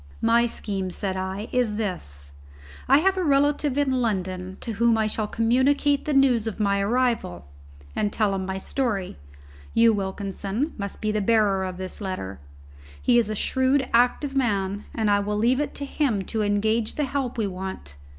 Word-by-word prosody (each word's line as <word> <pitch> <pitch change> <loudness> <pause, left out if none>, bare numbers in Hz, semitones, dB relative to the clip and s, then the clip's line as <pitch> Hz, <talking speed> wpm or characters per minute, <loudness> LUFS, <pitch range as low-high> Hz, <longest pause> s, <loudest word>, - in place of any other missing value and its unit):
"My 235 +1 +4
scheme," 195 -5 -4
said 190 +1 -3
I, 190 +3 -4
"is 245 -4 +1
this: 70 - -5 0.6
I 270 - +6
have 380 +5 +2
a 370 - 0
relative 290 -1 +2
in 285 -2 +2
London 190 -6 -2
to 230 - -4
whom 230 +1 +2
I 220 - +2
shall 215 0 -1
communicate 260 +6 +2
the 300 - 0
news 250 -5 +4
of 220 - -4
my 200 -1 +2
arrival 230 - 0 0.5
and 205 - 0
tell 210 -2 +1
him 190 -1 -2
my 190 0 -3
story. 200 - -2 0.6
You, 230 0 +6
Wilkinson 200 - -3
must 200 -2 -6
be 215 -1 0
the 215 0 0
bearer 205 -3 +2
of 185 -1 -4
this 185 +3 -5
letter. 185 - -5 0.6
He 240 -1 +4
is 225 -3 0
a 215 - -2
shrewd, 260 +4 +1
active 250 +4 +2
man, 205 -6 0
and 220 -2 0
I 205 - +4
will 210 +1 -2
leave 240 +5 +2
it 295 - -2
to 285 - -4
him 265 -9 0
to 220 +4 -3
engage 215 +2 +1
the 300 - 0
help 270 -3 -3
we 220 - 0
want. 185 - -6
215 Hz, 180 wpm, -25 LUFS, 195-250 Hz, 0.6 s, I